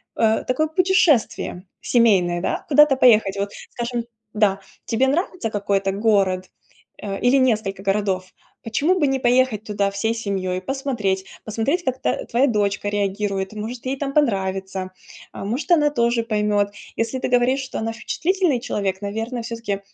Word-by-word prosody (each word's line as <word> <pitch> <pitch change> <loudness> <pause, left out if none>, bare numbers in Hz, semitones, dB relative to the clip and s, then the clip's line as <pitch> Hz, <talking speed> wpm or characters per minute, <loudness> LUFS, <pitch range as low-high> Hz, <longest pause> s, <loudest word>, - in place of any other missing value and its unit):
э, 220 -1 +2
такое 285 +5 +1
путешествие 315 - +2 0.2
семейное, 190 -8 +3
да? - - -2
Куда-то 295 -1 +6
поехать. 215 -6 +4
Вот, 200 0 -1 0.2
скажем 240 -1 -3 0.3
Да. 200 -2 +2 0.2
Тебе 250 +3 +1
нравится 335 - -1
какой-то 200 -2 0
город, 195 -3 +1 0.5
э, 195 -1 -4
или 245 +2 +4
несколько 215 -7 +1
городов? 195 -2 -1 0.3
Почему 310 +11 +1
бы 295 - +3
не 270 0 0
поехать 245 -3 +2
туда 200 -1 0
всей 220 +3 -1
семьей? 190 -4 -2
Посмотреть, 225 -7 -2 0.2
посмотреть, 270 - -1
как 260 0 -2
та - - -1
твоя 255 +4 +2
дочка 205 -3 0
реагирует. 200 -1 -2
Может, 225 +4 -6
ей 270 +1 -1
там 275 -1 -3
понравится. 190 -8 0 0.4
А, - - -7
может, 255 - -3
она 300 -3 +5
тоже 235 -4 +1
поймет. 210 -2 +1 0.3
Если 230 +3 -2
ты - - -2
говоришь, 250 +2 +2
что 265 - -5
она 225 +1 -2
впечатлительный 325 +4 0
человек, 195 -6 -2
наверно, 225 +4 -3
все-таки 230 -3 -4
225 Hz, 150 wpm, -22 LUFS, 200-260 Hz, 0.5 s, Куда-то